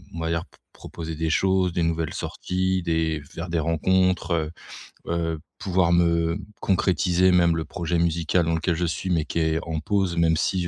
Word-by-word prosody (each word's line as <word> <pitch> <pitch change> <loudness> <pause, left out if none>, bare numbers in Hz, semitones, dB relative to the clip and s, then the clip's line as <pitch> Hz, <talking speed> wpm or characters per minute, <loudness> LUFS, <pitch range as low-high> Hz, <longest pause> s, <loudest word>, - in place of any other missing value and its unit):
on 85 - -5
va 80 - -2
dire 85 0 -1
p - - -25 0.2
proposer 80 -1 -7
des 80 0 -1
choses, 95 0 +2
des 85 - 0
nouvelles 80 -1 -1
sorties, 95 0 -2
des 80 -2 0
faire 85 +5 -7
des 85 - 0
rencontres, 90 +3 +1
heu 80 -1 -1 0.6
heu, 80 -2 -1 0.2
pouvoir 90 -2 +1
me 85 0 +2 0.2
concrétiser 90 -1 +2
même 85 -2 +4
le 80 - -1
projet 85 0 -2
musical 85 0 +1
dans 80 0 +1
lequel 85 +1 0
je 85 +1 -1
suis, 85 +3 -3
mais 80 -3 +2
qui 85 - -2
est 80 0 +1
en 80 -1 -3
pause 95 0 0
même 80 -1 +3
si 90 0 0
85 Hz, 190 wpm, -24 LUFS, 80-90 Hz, 0.6 s, même